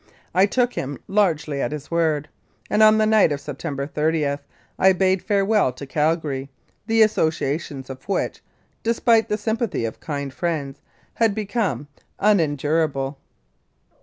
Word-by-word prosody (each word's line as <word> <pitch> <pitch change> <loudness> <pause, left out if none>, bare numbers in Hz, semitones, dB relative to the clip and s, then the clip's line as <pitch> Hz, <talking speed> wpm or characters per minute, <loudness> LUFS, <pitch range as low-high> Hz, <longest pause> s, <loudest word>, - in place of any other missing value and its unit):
I 190 +3 +5
took 245 +3 +1
him 140 +1 -4
largely 160 -8 +1
at - - -1
his 150 0 -7
word, 160 -3 +1 0.4
and 215 - +3
on 215 0 +7
the 215 - +3
night 215 -6 +4
of 145 - -1
September 140 0 -5
30 150 -1 0 0.4
I 190 0 +6
bade 185 0 +2
farewell 200 -6 +2
to 140 - -8
Calgary, 150 -2 -1 0.4
the 225 -1 +5
associations 155 -8 -1
of 130 +7 -10
which, 195 - -1 0.4
despite 230 0 +2
the 210 - 0
sympathy 220 - -1
of 110 - -5
kind 140 -3 -4
friends, 150 -5 -3 0.3
had 225 -3 +2
become 210 - -2 0.3
unendurable. 150 -6 +1
160 Hz, 135 wpm, -22 LUFS, 145-210 Hz, 0.4 s, on